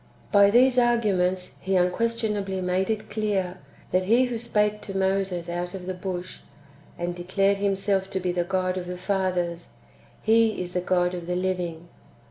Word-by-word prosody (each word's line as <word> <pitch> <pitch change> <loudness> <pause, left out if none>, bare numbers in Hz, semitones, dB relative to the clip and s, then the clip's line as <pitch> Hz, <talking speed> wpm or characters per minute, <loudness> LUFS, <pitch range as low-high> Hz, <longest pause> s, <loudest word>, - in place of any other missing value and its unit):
By 200 -1 +6
these 250 +3 +5
arguments 190 -7 +1
He 190 0 0
unquestionably 205 +1 0
made 185 +2 0
it 215 -2 -3
clear, 200 -4 -1 0.3
that 185 0 +2
He 235 +6 +4
who 240 -2 -3
spake 210 -2 0
to 195 -1 -5
Moses 190 -2 0
out 175 +1 -3
of 185 -2 -7
the 185 - -3
bush, 180 0 -5 0.6
and 175 0 -2
declared 195 +3 +1
Him 200 0 +1
self 195 -1 0
to 190 - -2
be 180 -1 -1
the 175 0 0
God 185 0 -1
of 175 - -7
the 180 0 -5
fathers. 180 -3 -2 0.5
He 225 0 +3
is 180 -1 -4
the 180 - -1
God 180 0 +1
of 175 -1 -6
the 180 - -1
living. 180 -2 -2
190 Hz, 175 wpm, -25 LUFS, 180-205 Hz, 0.6 s, By